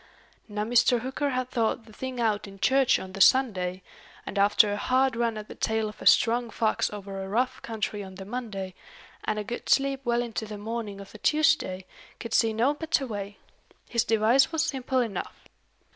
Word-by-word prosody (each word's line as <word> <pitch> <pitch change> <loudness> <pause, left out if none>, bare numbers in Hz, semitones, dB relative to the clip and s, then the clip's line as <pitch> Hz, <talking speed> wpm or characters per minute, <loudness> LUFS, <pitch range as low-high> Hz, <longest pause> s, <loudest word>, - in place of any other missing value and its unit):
Now 210 -1 -3
Mr. 240 +1 +3
Hooker 265 +3 -2
had 255 -1 -2
thought 225 -1 0
the 220 - -16
thing 260 +2 -5
out 215 -3 0
in 195 0 -12
church 265 +4 +4
on 190 0 -8
the 195 - -4
Sunday; 185 -7 +3 0.4
and 200 - -3
after 205 +1 +4
a - - -1
hard 255 +3 +2
run 230 -1 0
at 210 0 -7
the - - -9
tail 220 -1 -1
of 210 - -10
a - - 0
strong 235 0 +4
fox 220 -1 0
over 195 -1 -6
a 190 - -5
rough 245 +5 0
country 215 -2 -3
on 190 -1 -10
the 195 0 -8
Monday, 205 -5 -5 0.5
and 215 - -1
a 210 - -2
good 235 +4 -6
sleep 275 -1 +2
well 240 -1 +1
into 225 -2 -4
the 210 0 -7
morning 215 -1 -5
of 200 - -11
the 215 - -12
Tuesday, 305 - +2 0.3
could 230 - -6
see 225 -1 +4
no 235 +6 +2
better 310 -2 0
way. 205 -3 -6 0.5
His 235 -1 +2
device 230 +6 +3
was 320 -1 +1
simple 260 -2 0
enough. 225 -5 -5
225 Hz, 200 wpm, -27 LUFS, 205-255 Hz, 0.5 s, church